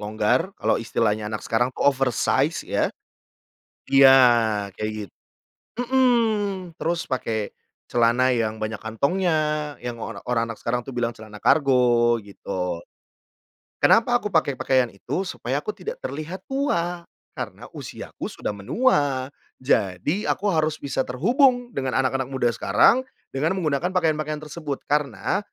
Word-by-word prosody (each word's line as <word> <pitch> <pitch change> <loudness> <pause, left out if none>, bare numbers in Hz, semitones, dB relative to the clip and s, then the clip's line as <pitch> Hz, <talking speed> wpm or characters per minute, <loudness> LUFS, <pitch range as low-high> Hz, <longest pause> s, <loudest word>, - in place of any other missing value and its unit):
longgar, 110 - 0
kalau - - +2
istilahnya 110 -2 -1
anak 110 - -4
sekarang 120 +3 +1
tuh - - 0
oversize 135 +2 +1
ya. - - +1 1.0
Iya 135 -1 +8 0.6
kayak 110 0 -2 0.2
git - - -32 0.7
mmm. 225 -7 +1
Terus 170 0 -1
pakai 110 -4 -2 0.3
celana 120 +2 +3
yang 110 -2 -1
banyak 110 -1 -3
kantongnya 150 - 0
yang 120 -1 -5
ora - - -6
orang 115 -2 0
anak 115 - -6
sekarang 120 +1 -2
tuh 135 - -6
bilang 120 -1 0
celana 110 -1 -12
kargo, 125 -4 +4
gitu. 90 -3 -4 1.0
Kenapa 245 +2 +5
aku - - -3
pakai 145 -5 +2
pakaian 130 -2 +2
itu? 170 - -3
Supaya 140 -5 -3
aku - - -2
tidak 455 - -7
terlihat 165 +6 -5
tua, 175 -11 -1 0.3
karena - - -6
usiaku - - -7
sudah - - -4
menua, 135 - +1 0.3
jadi 115 - 0
aku 205 - 0
harus 155 -2 +1
bisa 135 -1 -1
terhubung 245 - +2
dengan 130 -1 -2
anak-anak 130 0 -1
muda 130 -3 +1
sekarang 110 - +4 0.3
dengan 150 +6 +1
menggunakan 160 -1 0
pakaian-pakaian 155 -3 0
tersebut, 150 -2 -5
karena 140 - 0
135 Hz, 130 wpm, -24 LUFS, 115-170 Hz, 1.0 s, Iya